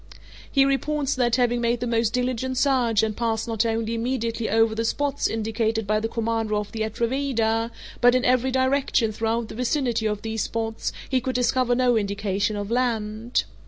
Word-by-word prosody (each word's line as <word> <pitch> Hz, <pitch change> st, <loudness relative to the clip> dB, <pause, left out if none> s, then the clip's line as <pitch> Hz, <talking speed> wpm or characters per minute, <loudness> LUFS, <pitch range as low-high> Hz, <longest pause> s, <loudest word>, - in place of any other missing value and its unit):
He 275 Hz, -1 st, +4 dB
reports 285 Hz, +1 st, 0 dB
that, 240 Hz, -2 st, +2 dB
having 240 Hz, -1 st, +1 dB
made 235 Hz, 0 st, +1 dB
the 245 Hz, -, -2 dB
most 230 Hz, -2 st, +1 dB
diligent 255 Hz, +1 st, -1 dB
search 245 Hz, -6 st, +2 dB
and 215 Hz, -1 st, -1 dB
passed 225 Hz, -1 st, -1 dB
not 225 Hz, 0 st, 0 dB
only 225 Hz, 0 st, -1 dB
immediately 230 Hz, -1 st, -2 dB
over 225 Hz, +1 st, +3 dB
the 225 Hz, +1 st, -1 dB
spots 285 Hz, +4 st, 0 dB
indicated 225 Hz, 0 st, -1 dB
by 215 Hz, +1 st, +1 dB
the 225 Hz, -, -1 dB
commander 225 Hz, -1 st, -1 dB
of 210 Hz, -1 st, -3 dB
the 225 Hz, -, -6 dB
Atrevida, 230 Hz, 0 st, 0 dB, 0.3 s
but 245 Hz, 0 st, +6 dB
in 255 Hz, -, +1 dB
every 255 Hz, +1 st, +3 dB
direction 260 Hz, -3 st, +1 dB
throughout 225 Hz, +1 st, -1 dB
the -, -, -7 dB
vicinity 245 Hz, -2 st, 0 dB
of 210 Hz, -1 st, -3 dB
these 220 Hz, -1 st, -2 dB
spots, 225 Hz, +1 st, -2 dB, 0.2 s
he 260 Hz, -1 st, +1 dB
could 260 Hz, +1 st, -3 dB
discover 250 Hz, 0 st, +2 dB
no 250 Hz, -1 st, +3 dB
indication 200 Hz, 0 st, -1 dB
of 205 Hz, +1 st, -4 dB
land. 230 Hz, -1 st, 0 dB
230 Hz, 180 wpm, -24 LUFS, 220-250 Hz, 0.3 s, but